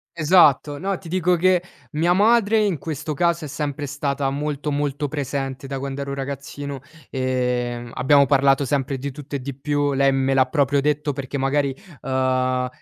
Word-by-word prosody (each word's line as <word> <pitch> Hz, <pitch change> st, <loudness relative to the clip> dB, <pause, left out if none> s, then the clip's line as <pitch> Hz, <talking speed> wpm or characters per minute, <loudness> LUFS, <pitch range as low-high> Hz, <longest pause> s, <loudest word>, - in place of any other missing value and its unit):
Esatto, 155 Hz, -3 st, +4 dB
no, 195 Hz, 0 st, -1 dB
ti 170 Hz, -, -11 dB
dico 180 Hz, 0 st, +2 dB
che 180 Hz, +1 st, +3 dB, 0.3 s
mia 165 Hz, +3 st, +1 dB
madre 220 Hz, +2 st, +4 dB
in 190 Hz, -7 st, 0 dB
questo 155 Hz, -1 st, -4 dB
caso 170 Hz, +2 st, 0 dB
è -, -, -5 dB
sempre 145 Hz, 0 st, -4 dB
stata 140 Hz, 0 st, -2 dB
molto, 150 Hz, +1 st, -3 dB
molto 145 Hz, 0 st, -1 dB
presente 135 Hz, -1 st, -4 dB
da 135 Hz, -, -4 dB
quando 135 Hz, +1 st, -4 dB
ero 140 Hz, 0 st, -4 dB
ragazzino, 140 Hz, 0 st, -6 dB, 0.3 s
ehm, 125 Hz, -2 st, -1 dB
abbiamo 140 Hz, +2 st, +4 dB
parlato 135 Hz, 0 st, +3 dB
sempre 135 Hz, 0 st, -1 dB
di 140 Hz, +2 st, -4 dB
tutto 145 Hz, +1 st, -8 dB
e -, -, -1 dB
di 140 Hz, +1 st, -5 dB
più, 145 Hz, +1 st, -1 dB
lei 135 Hz, 0 st, +3 dB
me 135 Hz, 0 st, +1 dB
l'ha 130 Hz, -1 st, +4 dB
proprio 140 Hz, -1 st, +2 dB
detto 150 Hz, 0 st, 0 dB
perché 140 Hz, 0 st, -5 dB
magari, 135 Hz, 0 st, 0 dB, 0.3 s
uhm, 130 Hz, -1 st, 0 dB
140 Hz, 175 wpm, -22 LUFS, 135-150 Hz, 0.3 s, Esatto